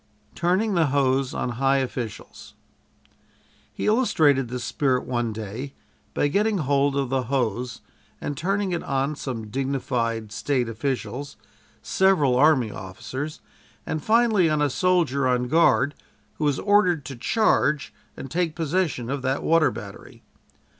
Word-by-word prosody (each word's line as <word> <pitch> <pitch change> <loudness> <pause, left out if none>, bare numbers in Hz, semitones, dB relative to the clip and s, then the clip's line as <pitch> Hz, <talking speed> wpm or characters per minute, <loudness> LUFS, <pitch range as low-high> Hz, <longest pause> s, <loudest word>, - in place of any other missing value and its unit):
TURNING 190 +5 +1
THE 165 -4 +3
HOSE 135 -1 +1
ON - - -2
HIGH 135 0 +4
OFFICIALS 120 -4 -7 1.2
He - - -5
illustrated 155 - +3
this 125 +1 -5
spirit 130 0 0
one 120 -2 -1
day 110 +6 -6 0.4
by - - +2
getting 205 +7 +1
hold 140 -2 +1
of 140 -2 -1
the 130 -1 0
hose 125 -2 -2 0.4
and 145 - -4
turning 195 +5 -1
it 175 - -1
on 135 +2 -1
some 115 -6 -5
dignified 125 -4 -2
State 125 +2 -1
officials, 130 +3 -4 0.5
several 180 -10 +3
army 130 -5 +4
officers, 130 +12 -6 0.4
and 155 -2 -3
finally 220 -6 +3
on 155 -1 +1
a 145 -2 +1
soldier 160 -6 +2
on 125 -1 +1
guard 155 0 +3 0.5
who 155 - 0
was 145 -2 +1
ordered 185 -7 +2
to 135 0 -6
charge 150 - +1 0.2
and 135 - -8
take 165 -2 -1
possession 160 -6 -1
of 140 +1 -3
that 130 +1 -1
water 165 -1 +4
battery. 100 -1 -10
140 Hz, 140 wpm, -24 LUFS, 125-165 Hz, 1.2 s, HIGH